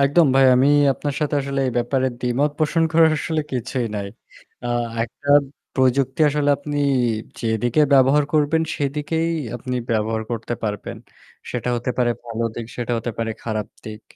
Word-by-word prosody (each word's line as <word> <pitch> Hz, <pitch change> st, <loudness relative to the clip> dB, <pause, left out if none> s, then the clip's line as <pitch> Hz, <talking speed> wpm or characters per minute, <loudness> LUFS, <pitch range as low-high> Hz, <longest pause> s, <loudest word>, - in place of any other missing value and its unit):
একদম 145 Hz, +4 st, +4 dB
ভাই। 135 Hz, -, +5 dB
আমি 130 Hz, +3 st, +4 dB, 0.2 s
আপনার 145 Hz, +1 st, -4 dB
সাথে 150 Hz, -1 st, 0 dB
আসলে 135 Hz, 0 st, -2 dB
এই 125 Hz, -, -1 dB
ব্যাপারে 130 Hz, +2 st, 0 dB
দ্বিমত 125 Hz, +4 st, +1 dB
পোষণ 160 Hz, +1 st, +1 dB
করার 160 Hz, 0 st, +6 dB
আসলে 160 Hz, -2 st, -1 dB
কিছুই 125 Hz, 0 st, -2 dB
নাই। 100 Hz, -1 st, -3 dB, 0.6 s
আ -, -, -2 dB, 0.3 s
একটা 120 Hz, +5 st, -8 dB, 0.5 s
প্রযুক্তি 130 Hz, +2 st, +1 dB
আসলে 145 Hz, 0 st, 0 dB
আপনি 145 Hz, 0 st, -5 dB, 0.6 s
যেদিকে 115 Hz, +4 st, +1 dB
ব্যবহার 140 Hz, +2 st, +5 dB
করবেন 155 Hz, +1 st, +2 dB
সেদিকেই 150 Hz, +3 st, -1 dB, 0.3 s
আপনি 125 Hz, +1 st, -4 dB
ব্যবহার 110 Hz, 0 st, 0 dB
করতে 120 Hz, 0 st, -3 dB
পারবেন। 105 Hz, -2 st, -4 dB, 0.5 s
সেটা -, -, -3 dB
হতে 120 Hz, +2 st, -2 dB
পারে 120 Hz, -1 st, +3 dB
ভালো 115 Hz, 0 st, -3 dB
দিক, 115 Hz, -, -5 dB
সেটা 120 Hz, 0 st, -3 dB
হতে 120 Hz, +1 st, -3 dB
পারে 115 Hz, 0 st, -1 dB
খারাপ 110 Hz, -2 st, -3 dB, 0.2 s
দিক। 110 Hz, 0 st, -8 dB
130 Hz, 155 wpm, -21 LUFS, 115-145 Hz, 0.6 s, করার